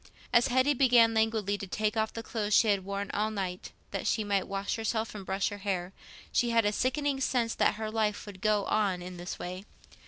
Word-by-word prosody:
As 240 -1 +5
Hetty 260 +3 +3
began 245 -4 +5
languidly 220 -2 +1
to 200 - -6
take 215 +3 -1
off 220 0 0
the 230 - -6
clothes 215 -2 -1
she 225 - +5
had 200 -2 +2
worn 200 +1 -4
all 215 +1 +1
the 215 - -7
night, 185 -2 -4 0.2
that - - -3
she 220 - +1
might 200 -2 0
wash 195 0 -2
herself 225 0 -2
and 205 -2 -7
brush 190 +1 -1
her 205 -1 -7
hair, 190 -2 -2 0.4
she 240 - +2
had 230 -2 +3
a 205 - +3
sickening 270 +4 0
sense 240 -3 +1
that - - +2
her 215 0 -4
life 215 -2 -1
would 200 -3 -10
go 210 -1 +2
on 195 -4 0
in 180 0 -8
this 175 +1 -6
way. 185 +2 -6
210 Hz, 225 wpm, -30 LUFS, 195-225 Hz, 0.4 s, As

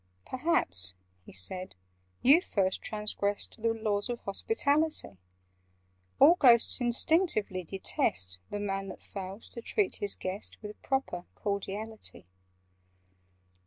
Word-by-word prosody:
"Perhaps," 250 - 0 0.3
he - - -10
said, 185 - +2 0.5
"you 290 +7 +7
first 190 - 0
transgressed 210 0 -2
The 230 0 +2
laws 215 -1 -1
of 240 -1 -3
hospitality: 295 - 0 1.0
All 330 - +9
Ghosts 240 -1 +6
instinctively 240 - +2
detest 95 - -1
The 205 - -4
Man 195 -1 -2
that - - -9
fails 195 +1 -7
to 235 - -8
treat 400 - 0
his 205 -1 -1
guest 190 +3 -4
With 210 0 -9
proper 265 -10 -2
cordiality. 205 - -4
210 Hz, 110 wpm, -30 LUFS, 190-245 Hz, 1.0 s, All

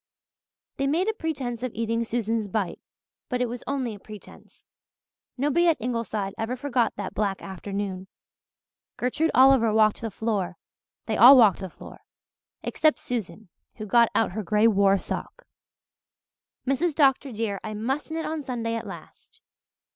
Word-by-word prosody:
They 275 - 0
made 335 +8 +1
a 445 - +1
pretence 270 - -4
of 255 -1 -3
eating 230 +1 -1
Susan's 225 -2 -2
"bite," 195 -3 -2 0.5
but 250 - -1
it 250 - +2
was 240 +1 -7
only 265 -5 -2
a 205 - -11
pretence. 210 +1 -14 0.7
Nobody 295 +6 +2
at 325 -3 +4
Ingleside 220 -4 -3
ever 225 +3 -2
forgot 250 -3 0
that 200 -2 -5
black 200 -2 -1
afternoon. 195 0 -5 0.9
Gertrude 300 +6 0
Oliver 260 -3 +6
walked 215 +1 +3
the 225 - -3
floor 195 -4 -2 0.5
they 220 - -1
all 260 +4 +10
walked 215 -7 +5
the 190 - -6
floor; - - -13 0.6
except 310 -1 +2
Susan, 225 - -5 0.3
who 215 - -7
got 235 +2 +4
out 225 - +2
her 215 +4 -3
grey 210 +3 +2
war 200 -2 +4
sock. - - -6 1.2
"Mrs. 285 +4 0
Dr. 275 -2 +3
dear, 215 -3 -3
I 215 -1 -5
must 265 +9 -2
knit 320 0 -3
on 315 0 -3
Sunday 235 -4 -3
at 230 - -4
last. - - -12
230 Hz, 155 wpm, -25 LUFS, 210-270 Hz, 1.2 s, all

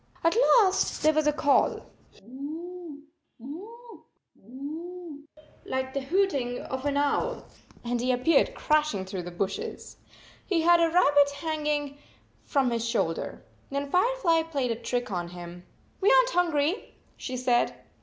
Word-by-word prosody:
At 330 +3 +3 0.2
last 390 -5 +2
there 310 +1 +5
was 310 0 +1
a - - +5
call, 290 -1 +2 0.2
" - - -27
Hoo, 300 - -8 0.3
hoo, 425 - -11 0.4
hoooooo," 300 - -8 0.4
like 260 0 -3
the 275 - -1
hooting 275 -6 0
of 265 +2 -4
an 285 0 0
owl, 290 - 0 0.4
and 240 0 -1
he 255 +1 +1
appeared 255 +5 +2
crashing 300 -11 +1
through 190 -1 -5
the 175 - -7
bushes. 190 +3 -4 0.5
He 350 -4 0
had 345 +1 +5
a 335 -1 +4
rabbit 290 -4 +5
hanging 295 -2 -2 0.5
from 275 -4 +1
58 - - 0
his 230 0 -2
shoulder. 165 -8 -2 0.2
Then 280 0 -3
Firefly 365 -4 +3
played 285 -7 -2
a - - 0
trick 245 +1 -3
on 175 -2 -2
him. 175 0 -10 0.2
" - - -35
We 405 +5 +5
aren - - +6
t - - -5
hungry," 335 +1 0 0.2
she 255 - -5
said. 245 -1 +1
285 Hz, 155 wpm, -27 LUFS, 250-335 Hz, 0.5 s, aren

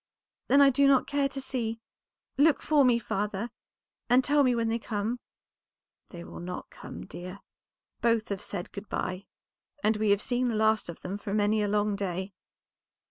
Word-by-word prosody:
"Then 280 - +6
I 275 -1 +7
do 280 +2 +4
not 270 -2 +5
care 280 -1 0
to 270 - -5
see. 240 -4 -3 0.6
Look 295 +2 +4
for 300 -2 +4
me, 245 -2 +5
father, 210 0 -3 0.6
and 250 +2 +5
tell 290 +2 +3
me 250 -2 +3
when 230 -1 0
they 230 +1 0
come." 220 +2 -2 0.9
"They 170 -2 -9
will - - -9
not 180 +1 -6
come, - - -9
dear; 185 +2 -9 0.6
both 230 -2 +2
have 200 -2 -3
said 180 -3 -6
good 200 +1 -8
by, 185 +2 -3 0.6
and 215 0 +3
we 215 0 +1
have 200 +1 +3
seen 250 0 0
the 235 - -1
last 220 -2 +2
of 170 - -8
them 195 +3 -5
for 205 -1 -3
many 210 +1 +2
a 205 - +1
long 205 0 +1
day." 190 0 -3
220 Hz, 185 wpm, -28 LUFS, 200-250 Hz, 0.9 s, I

